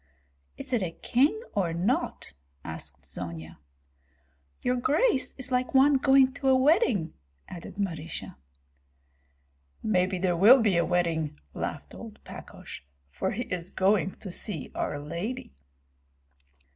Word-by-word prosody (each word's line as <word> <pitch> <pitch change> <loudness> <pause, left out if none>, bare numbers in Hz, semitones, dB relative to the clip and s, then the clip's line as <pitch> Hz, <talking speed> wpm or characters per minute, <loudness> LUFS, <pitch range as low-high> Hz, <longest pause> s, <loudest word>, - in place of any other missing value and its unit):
"Is - - -5
it 240 - +2
a 180 - -1
king 270 - +1
or 180 -5 0
not?" 190 +9 -1 0.3
asked 80 -3 -8
Zonia. 80 +3 -7 1.0
"Your 250 - +2
grace 285 - +2
is 260 -1 -4
like 250 +1 0
one 275 +1 +6
going 265 -1 +5
to 275 -1 -3
a 260 - +6
wedding," 260 - +3 0.3
added 175 -2 -9
Marysia. 165 -5 -4 1.5
"Maybe 185 -3 +2
there 180 -1 +1
will 220 +10 +8
be 210 -5 +3
a 170 - +3
wedding," 165 - 0 0.2
laughed - - -5
old - - -9
Pakosh, - - -10 0.3
"for - - -2
he 245 - -2
is 180 -4 -4
going 190 0 +2
to 190 - -6
see 175 -4 -6
our - - -2
lady." 170 - -5
195 Hz, 130 wpm, -28 LUFS, 165-255 Hz, 1.5 s, will